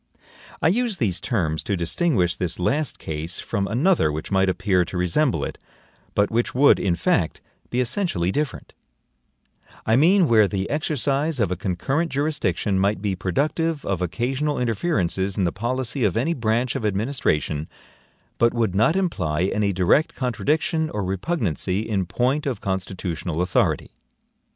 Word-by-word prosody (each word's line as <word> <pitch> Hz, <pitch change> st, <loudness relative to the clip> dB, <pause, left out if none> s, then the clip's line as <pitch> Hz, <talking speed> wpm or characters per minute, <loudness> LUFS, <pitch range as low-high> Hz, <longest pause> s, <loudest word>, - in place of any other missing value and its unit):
I -, -, +5 dB
use 230 Hz, +1 st, 0 dB
these 95 Hz, -, 0 dB
terms 80 Hz, -9 st, -1 dB
to 100 Hz, -, -2 dB
distinguish 90 Hz, -, +1 dB
this 90 Hz, -3 st, -2 dB
last 140 Hz, -, 0 dB
case 80 Hz, +2 st, -4 dB
from 100 Hz, -3 st, -2 dB
another 135 Hz, -, +2 dB
which 75 Hz, +5 st, -5 dB
might 95 Hz, -1 st, +3 dB
appear 95 Hz, -1 st, +2 dB
to 90 Hz, -, -6 dB
resemble 90 Hz, -, +1 dB
it, -, -, -7 dB, 0.6 s
but 100 Hz, 0 st, +2 dB
which 120 Hz, +2 st, 0 dB
would, 140 Hz, +2 st, +5 dB
in 90 Hz, -3 st, +1 dB
fact, -, -, 0 dB, 0.3 s
be 125 Hz, -, -1 dB
essentially 125 Hz, -, 0 dB
different; 145 Hz, +2 st, -3 dB, 1.1 s
I 110 Hz, -, +3 dB
mean 175 Hz, +6 st, +5 dB
where 110 Hz, -4 st, +5 dB
the 95 Hz, -1 st, -2 dB
exercise 145 Hz, 0 st, 0 dB
of 100 Hz, -6 st, +1 dB
a -, -, 0 dB
concurrent 100 Hz, -, -1 dB
jurisdiction 140 Hz, -8 st, 0 dB
might 100 Hz, +1 st, +1 dB
be 100 Hz, -1 st, -1 dB
productive 145 Hz, -, -1 dB
of 95 Hz, -2 st, -1 dB
occasional 130 Hz, -, -1 dB
interferences 100 Hz, -, -1 dB
in 100 Hz, -, +1 dB
the 85 Hz, -, +1 dB
POLICY 120 Hz, +4 st, -2 dB
of 105 Hz, -1 st, +1 dB
any 155 Hz, +9 st, +1 dB
branch 120 Hz, -1 st, 0 dB
of -, -, -3 dB
administration, 95 Hz, -, -1 dB, 0.7 s
but 115 Hz, +1 st, +3 dB
would 115 Hz, -5 st, +1 dB
not 110 Hz, -, +3 dB
imply 90 Hz, -, 0 dB
any 105 Hz, -1 st, +1 dB
direct 95 Hz, -, +2 dB
contradiction 150 Hz, -, 0 dB
or 105 Hz, -, -3 dB
repugnancy 95 Hz, -, -1 dB
in 100 Hz, -5 st, -1 dB
point 130 Hz, -, 0 dB
of 130 Hz, -, -2 dB
constitutional 90 Hz, -3 st, -3 dB
authority. 90 Hz, 0 st, +1 dB
110 Hz, 150 wpm, -23 LUFS, 90-140 Hz, 1.1 s, I